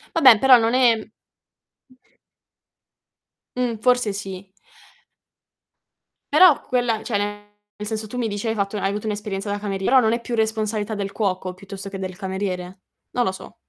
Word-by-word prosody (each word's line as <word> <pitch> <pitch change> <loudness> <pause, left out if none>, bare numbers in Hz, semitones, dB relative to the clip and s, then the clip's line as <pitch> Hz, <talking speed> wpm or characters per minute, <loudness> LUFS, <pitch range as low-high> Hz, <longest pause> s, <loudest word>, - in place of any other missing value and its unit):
Vabbè, 255 -9 +7
però 265 -2 +7
non 230 +1 +1
è 230 -4 +3 2.5
Mh. 245 -3 -1
Forse 245 -4 +2
sì. 195 -1 -7 1.8
Però 360 -6 +7
quella 240 -3 0
cioè 210 -4 -1 0.6
nel 210 - -5
senso 220 0 -3
tu 250 - -7
mi 235 - 0
dici 205 +1 -4
hai 225 - +1
fatto 200 0 -2
hai 195 - 0
avuto 210 +2 -4
un'esperienza 205 -1 -4
da 205 - -1
camerie 195 -2 -4
però 265 +1 +6
non 220 - +2
è 235 - 0
più 235 - -4
responsabilità 220 -1 -1
del 200 -1 -4
cuoco 185 -3 -2
piuttosto 195 +1 -9
che 195 - -6
del 185 -1 -6
cameriere? 190 -1 -4 0.4
Non 245 - +3
lo 190 - +1
so. 190 - -11
210 Hz, 160 wpm, -22 LUFS, 195-230 Hz, 2.5 s, Vabbè